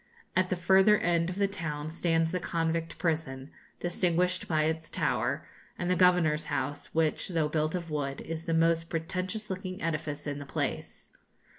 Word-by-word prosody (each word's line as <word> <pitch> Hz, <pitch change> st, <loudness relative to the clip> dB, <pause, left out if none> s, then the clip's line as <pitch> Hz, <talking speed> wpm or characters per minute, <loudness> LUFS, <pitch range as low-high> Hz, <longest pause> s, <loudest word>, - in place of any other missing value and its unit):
At 185 Hz, 0 st, +3 dB
the 185 Hz, -, +1 dB
further 190 Hz, +4 st, +5 dB
end 170 Hz, -1 st, +1 dB
of 180 Hz, -, -4 dB
the 200 Hz, 0 st, +2 dB
town 155 Hz, -6 st, -4 dB
stands 165 Hz, -1 st, +1 dB
the 180 Hz, -, 0 dB
convict 165 Hz, -1 st, -1 dB
prison, 150 Hz, -5 st, -2 dB, 0.3 s
distinguished 180 Hz, +1 st, +1 dB
by 155 Hz, -2 st, +2 dB
its 160 Hz, +1 st, -1 dB
tower, -, -, 0 dB, 0.3 s
and 175 Hz, +1 st, -1 dB
the -, -, +4 dB
Governor's 175 Hz, -4 st, +4 dB
house, 145 Hz, +1 st, -2 dB
which, 160 Hz, -1 st, +1 dB
though 165 Hz, -4 st, 0 dB
built 155 Hz, +2 st, 0 dB
of 170 Hz, -3 st, -4 dB
wood, 140 Hz, -2 st, -2 dB
is 165 Hz, 0 st, -5 dB
the 165 Hz, -, +1 dB
most 165 Hz, 0 st, +3 dB
pretentious 185 Hz, +6 st, -3 dB
looking 185 Hz, 0 st, -4 dB
edifice 155 Hz, -2 st, -2 dB
in 145 Hz, -1 st, -3 dB
the 145 Hz, -, -7 dB
place. -, -, -4 dB
165 Hz, 170 wpm, -30 LUFS, 155-180 Hz, 0.3 s, further